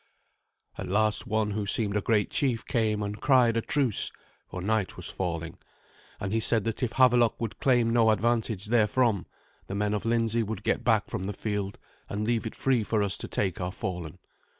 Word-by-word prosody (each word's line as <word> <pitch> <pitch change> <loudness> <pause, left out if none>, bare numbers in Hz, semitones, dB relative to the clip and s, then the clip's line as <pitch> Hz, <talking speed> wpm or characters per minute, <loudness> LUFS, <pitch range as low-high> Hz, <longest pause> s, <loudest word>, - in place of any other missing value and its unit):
At - - -4
last 110 +5 +1
one 110 -2 0
who 105 0 -2
seemed 100 -1 +1
a 105 - +1
great 105 0 +1
chief 125 -5 +1
came 110 -4 0
and 105 +1 -5
cried 125 -4 +4
a 115 - +1
truce, 130 -4 +1 0.4
for 90 - -6
night 105 +1 -1
was - - -8
falling; 85 -3 -4 0.6
and 95 +1 -3
he 115 - +2
said 115 -1 +3
that 115 +2 -3
if 125 -3 -1
Havelok 125 -3 +4
would 115 -3 -4
claim 120 -3 +3
no 115 -2 +4
advantage 110 -2 0
therefrom, 115 -2 +2 0.4
the 95 - -4
men 105 0 0
of 105 - -2
Lindsey 115 0 +1
would 110 -1 -4
get - - 0
back 110 -4 +3
from 95 - -5
the 100 - -3
field, 100 -1 -3 0.3
and 105 +1 -2
leave 115 -1 0
it - - -8
free 130 -4 +1
for 105 0 0
us 100 -2 0
to - - -5
take 95 -2 -2
our 90 +1 -2
fallen. 90 -4 -5
110 Hz, 195 wpm, -28 LUFS, 100-115 Hz, 0.6 s, cried